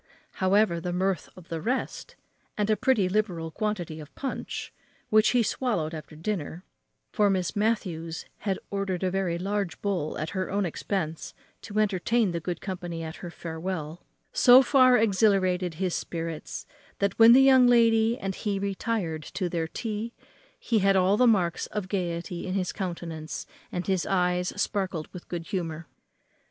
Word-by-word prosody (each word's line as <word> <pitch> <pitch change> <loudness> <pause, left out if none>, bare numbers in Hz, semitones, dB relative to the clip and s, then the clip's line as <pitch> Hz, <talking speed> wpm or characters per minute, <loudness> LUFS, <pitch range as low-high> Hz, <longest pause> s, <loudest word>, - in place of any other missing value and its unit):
However, 190 -2 +3
the 180 - -3
mirth 185 -1 -1
of 180 -2 -14
the 165 -1 -3
rest, 255 +7 -3 0.4
and 210 +1 +1
a - - +4
pretty 210 -3 +2
liberal 180 -5 -1
quantity 180 -6 -3
of 150 0 -12
punch, 270 -2 -5 0.4
which 215 0 +5
he 245 -2 +3
swallowed 190 -10 -1
after 155 -1 -8
dinner 170 0 -4 0.5
(for 210 -1 +3
Miss 185 -2 0
Matthews 180 -7 -1
had 195 -3 -1
ordered 195 -2 -2
a 185 - +1
very 185 -3 0
large 195 0 -2
bowl 185 -7 -2
at 155 +1 -3
her 185 -1 -2
own 200 0 0
expense 165 -1 -3 0.3
to 210 -1 -7
entertain 215 +1 +2
the 170 - -2
good 175 0 -4
company 175 -4 -5
at 160 0 -6
her 175 - -7
farewell), 165 -1 -5 0.3
so 260 - +8
far 255 -2 +6
exhilarated 190 -5 +2
his 180 +1 -1
spirits, 165 -2 -4 0.3
that 200 +1 -1
when 225 +1 +9
the 265 +2 +7
young 260 -2 +7
lady 230 -1 +4
and 195 0 -3
he 205 0 -2
retired 195 -4 -2
to 180 +3 -3
their 165 -2 -1
tea 225 +5 -4 0.4
he 235 - +1
had 195 0 +3
all 190 +1 +4
the 250 +3 +4
marks 180 -7 +2
of 210 -3 -4
gayety 175 -2 -3
in 185 - -2
his 185 -2 -1
countenance, 170 -4 -5 0.3
and 180 0 -3
his 190 -3 0
eyes 180 -1 +1
sparkled 190 -6 -1
with 180 - -9
good 170 -2 -5
humour. 170 -5 -3
190 Hz, 165 wpm, -27 LUFS, 170-210 Hz, 0.5 s, when